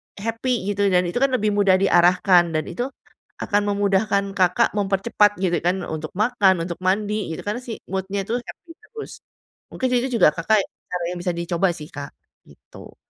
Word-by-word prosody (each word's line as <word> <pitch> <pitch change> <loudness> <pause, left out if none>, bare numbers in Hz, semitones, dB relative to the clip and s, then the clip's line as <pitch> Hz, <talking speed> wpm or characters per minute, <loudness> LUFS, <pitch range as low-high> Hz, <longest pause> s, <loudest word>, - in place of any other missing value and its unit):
happy 225 0 -2
gitu 205 0 +1
dan 180 -1 +3
itu 210 - -2
kan 275 - +4
lebih 215 -3 +1
mudah 200 -2 +4
diarahkan 180 -2 +4
dan 155 - +1
itu 245 +2 -3 0.6
akan 205 0 +1
memudahkan 200 0 +1
Kakak 180 -1 +3
mempercepat 205 +1 +2
gitu 175 -2 +2
kan, 180 +1 +1
untuk 155 0 -5
makan, 200 -5 +2
untuk 170 -1 -6
mandi, 205 +2 0
gitu - - -8
kan. 210 +4 -3
Si 245 -3 -7 0.2
mood-nya 195 +1 -2
itu 230 - -1
happy 330 +7 -12
terus. 440 0 -10 0.5
Mungkin 260 - -2
itu 255 - -2
juga 175 - +7
Kakak 210 +6 +2 0.5
yang 180 - -5
bisa 180 0 -1
dicoba 170 +2 0
sih, 150 -1 -9
Kak, 140 -1 -7 0.4
gitu. - - -15
195 Hz, 170 wpm, -22 LUFS, 180-215 Hz, 0.6 s, juga